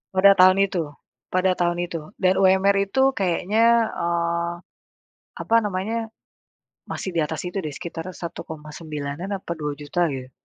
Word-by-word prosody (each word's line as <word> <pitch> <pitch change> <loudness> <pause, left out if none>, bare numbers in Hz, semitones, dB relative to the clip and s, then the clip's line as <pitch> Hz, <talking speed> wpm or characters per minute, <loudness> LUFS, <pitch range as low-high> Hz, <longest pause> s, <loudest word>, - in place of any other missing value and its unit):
Pada 195 +1 +7
tahun 185 0 +6
itu, 170 -6 -3 0.4
pada 185 0 +2
tahun 175 -1 0
itu 165 -2 -5 0.2
dan 185 -1 +3
UMR 190 +1 +4
itu 270 +2 +3
kayaknya, 220 +5 +3
eee, 170 0 -1 0.9
apa 230 - +1
namanya 215 +3 -2 0.8
masih 190 - -4
di - - +2
atas 155 +1 -2
itu, 180 +2 -5
deh, 155 -4 -4
sekitar 165 0 -6
Rp1.900.000 155 0 -6
atau 185 -2 -7
Rp2.000.000, 150 +3 -1
gitu. 130 -2 -6
175 Hz, 130 wpm, -23 LUFS, 160-195 Hz, 0.9 s, Pada